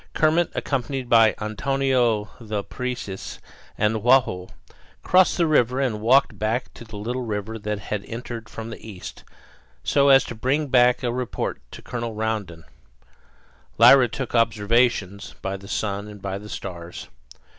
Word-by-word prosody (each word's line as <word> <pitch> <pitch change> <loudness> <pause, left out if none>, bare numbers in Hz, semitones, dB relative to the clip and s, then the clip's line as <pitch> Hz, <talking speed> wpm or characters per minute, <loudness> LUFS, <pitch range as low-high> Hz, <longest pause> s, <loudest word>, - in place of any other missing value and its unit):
Kermit, 160 +2 +3
accompanied 130 -1 -2
by 115 -2 +5
Antonio 120 -1 0
the 110 -3 -4
Parecis 125 -6 -5 0.4
and 105 +1 +1
Joao, 115 -7 +3 0.6
crossed 185 0 +4
the 170 - +3
river 130 -5 +2
and 120 -6 -1
walked 120 -2 +3
back 110 +4 -2
to - - -11
the 110 -2 -10
little 120 +5 -3
river 110 -1 -4
that 105 0 -3
had 100 0 -4
entered 115 -1 -7
from 115 0 -7
the - - -10
east, 100 -5 -9 0.6
so 140 - +3
as 135 -1 +7
to - - -7
bring 135 +6 -1
back 125 0 +4
a 120 -1 0
report 125 -1 -3
of - - -34
it - - -38
to - - -9
Colonel 115 -2 -5
Rondon. 105 -7 -3 1.1
Lyra 135 -3 +8
took 135 +1 -5
observations, 115 -3 +1
by 95 0 -2
the 100 0 -10
sun 100 0 -3
and 105 -1 -10
by 95 0 -4
the 105 +1 -11
stars. 85 -4 -7
115 Hz, 155 wpm, -23 LUFS, 105-125 Hz, 1.1 s, Lyra